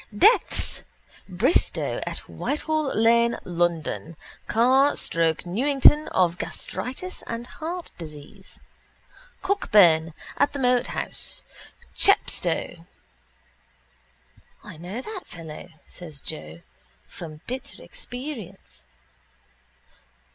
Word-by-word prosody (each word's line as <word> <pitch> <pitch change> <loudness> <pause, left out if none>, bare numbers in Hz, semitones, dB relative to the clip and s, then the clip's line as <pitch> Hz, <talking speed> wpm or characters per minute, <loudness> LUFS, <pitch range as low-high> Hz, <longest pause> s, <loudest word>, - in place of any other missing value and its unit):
Deaths. 445 - +4 0.5
Bristow, 205 - +1
at - - -5
Whitehall 305 0 -1
lane, 235 +1 +4
London: 170 -2 -1 0.3
Carr, 260 +5 +4
Stoke 165 0 0
Newington, 275 +9 +5
of 180 -2 +2
gastritis 365 +9 -4
and 230 +1 -4
heart 335 +6 -6
disease: 150 -3 -11 0.9
Cockburn, 175 - +4 0.2
at 285 - +3
the - - -3
Moat 250 -2 +2
house, - - -4 0.5
Chepstow... 175 - +2 1.8
—I - - -10
know 180 +9 -6
that 425 -4 -7
fellow, 165 0 -9 0.2
says 160 -5 -10
Joe, 80 - -6 0.5
from 155 -2 -9
bitter 265 +3 -6
experience. 250 - -8
230 Hz, 85 wpm, -25 LUFS, -, 1.8 s, Newington